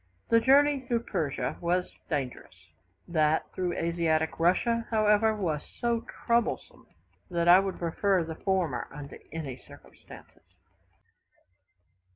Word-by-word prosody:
The 230 - +6
journey 280 +3 +4
through 240 -3 -2
Persia 145 - -2
was 180 +1 0 0.2
dangerous; 135 - -4 0.5
that 155 -2 +2
through 180 -2 -2
Asiatic 165 -1 0
Russia, 230 +7 +2
however, 215 0 +3
was 165 -8 -2 0.2
so 235 -1 0 0.2
troublesome, 235 0 -1 0.4
that 170 -1 0
I 175 +2 +9
would 195 -1 -3
prefer 180 +2 +1
the 160 0 -6
former 170 -8 -1
under 145 0 -10
any 145 -5 -5
circumstances. 90 +2 -16
175 Hz, 115 wpm, -28 LUFS, 160-220 Hz, 0.5 s, I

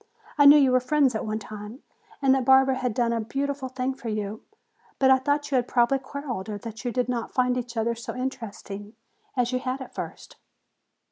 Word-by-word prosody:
I 285 -1 +7
knew 290 +1 +10
you 270 -3 +5
were 255 - +5
friends 265 0 +2
at 220 - -3
one 215 0 -1
time 215 +4 -9 0.4
and 265 -1 +5
that 265 -1 +1
Barbara 265 +1 +5
had 250 -4 -2
done 235 -1 +1
a 230 - 0
beautiful 275 +3 -3
thing 260 +1 -2
for 250 -3 -7
you. 215 0 -3 0.6
But 265 -1 +4
I 265 - +6
thought 290 +2 -1
you 265 - +3
had 245 -1 0
probably 245 +2 +2
quarreled, 260 -7 -6
or 210 - -3
that 225 +2 -8
you 245 - -1
did 250 0 0
not 240 -2 -3
find 250 -1 +2
each 245 -1 -5
other 230 +1 +1
so 230 0 -7
interesting 220 -5 -6 0.4
as 245 0 +1
you 255 - 0
had 255 +1 -3
at 260 - -9
first." - - -8
250 Hz, 215 wpm, -26 LUFS, 230-265 Hz, 0.6 s, knew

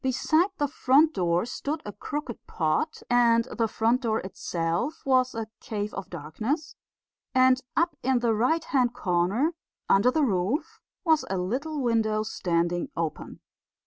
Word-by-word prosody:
Beside 310 +7 +2
the 290 - +1
front 285 +4 +3
door 175 +1 +1
stood 285 +5 -3
a 205 - -5
crooked 280 +3 -6
pot, 165 - -1
and 235 -1 +4
the 225 - +3
front 230 +4 +1
door 225 -3 0
itself 175 - -3
was 255 -2 +2
a 225 -1 -2
cave 210 -1 -4
of 195 -1 -6
darkness, 215 - -4 0.6
and 255 0 +5 0.2
up 335 -1 +2
in 265 0 +2
the 235 -2 +1
right 255 +10 +1
hand 250 -6 +1
corner, 195 - +1 0.3
under 200 +6 +4
the 305 +4 +1
roof, 210 - -1 0.2
was 320 -4 +3
a 190 - -1
little 265 +12 -2
window 220 -2 +1
standing 175 -4 -1
open. 165 -2 -4
235 Hz, 145 wpm, -27 LUFS, 190-280 Hz, 0.6 s, and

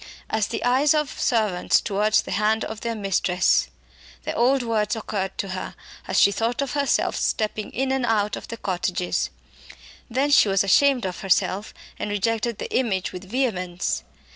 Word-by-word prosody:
"As 220 -1 +1
the 230 - -4
eyes 265 +5 +3
of 300 -3 -2
servants 210 -6 +2
towards 210 +2 +1
the - - -7
hand 215 +2 +1
of 220 0 -7
their 230 -1 -2
mistress" 190 -3 +1 0.5
the - - -3
old 255 +2 +2
words 225 -1 0
occurred 195 -3 -4
to 195 - -3
her 185 0 -5 0.3
as - - +2
she 200 - +6
thought 230 +6 -1
of 275 - -4
herself 285 -1 +1
stepping 215 -1 -1
in 265 +2 -1
and 265 -1 0
out 210 -3 +1
of - - -9
the 230 - -6
cottages. 180 -3 -1 0.8
Then 270 +5 0
she 220 - +6
was 195 0 +3
ashamed 255 +5 +4
of 185 -1 -4
herself 195 +2 0 0.3
and - - -3
rejected 225 +2 -1
the - - -5
image 205 -8 0
with 180 +1 -8
vehemence. 185 - -1
215 Hz, 170 wpm, -24 LUFS, 195-245 Hz, 0.8 s, she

